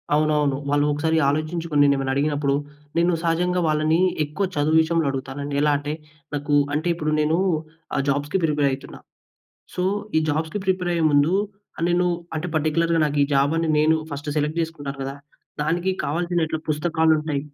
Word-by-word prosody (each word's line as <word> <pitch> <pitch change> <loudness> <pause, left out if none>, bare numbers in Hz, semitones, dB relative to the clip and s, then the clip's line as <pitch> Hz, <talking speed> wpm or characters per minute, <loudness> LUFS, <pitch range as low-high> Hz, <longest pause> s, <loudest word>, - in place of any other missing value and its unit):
అవునవును. 150 -2 +2
వాళ్ళు 145 0 +2
ఒకసారి 160 +2 0
ఆలోచించుకొని 155 0 0
నేనేమైనా 135 -1 +2
అడిగినప్పుడు 145 -1 +1 0.4
నేను 170 +1 +3
సహజంగా 180 +2 +1
వాళ్ళని 155 +2 +2 0.3
ఎక్కువ 155 +7 -2
చదువు 150 +2 +2
విషయంలో 165 0 +1
అడుగుతానండి. 135 +1 -4
ఎలా 150 0 +3
అంటే 145 +1 -4 0.4
నాకు 145 +1 -2 0.2
అంటే 155 +4 -1
ఇప్పుడు 155 -2 -2
నేను 155 +2 +2 0.6
ఆ - - +1
జాబ్స్‌కి 145 +6 0
ప్రిపేర్ 150 -3 +2
అయితున్నా. 135 +1 -7 0.8
సో, 180 - -1 0.3
ఈ - - +6
జాబ్స్‌కి 160 +5 -2
ప్రిపేర్ 180 -1 0
అయ్యే 165 -2 +1
ముందు 145 +4 +3 0.6
నేను 180 +1 +2 0.3
అంటే 160 +3 -2
పార్టిక్యులర్‌గా 165 +2 +1
నాకు 145 0 -3
ఈ - - -2
జాబ్ 140 +2 +3
అని 165 -1 0
నేను 155 +1 +4
ఫస్ట్ 145 +1 -6
సెలెక్ట్ 150 +2 0
చేసుకుంటాను 145 -4 -6
కదా! 135 +1 -4 0.5
దానికి 175 +4 0
కావాల్సిన 170 +2 0 0.2
పుస్తకాలుంటాయి. 155 -2 +1
155 Hz, 150 wpm, -23 LUFS, 145-165 Hz, 0.8 s, ఈ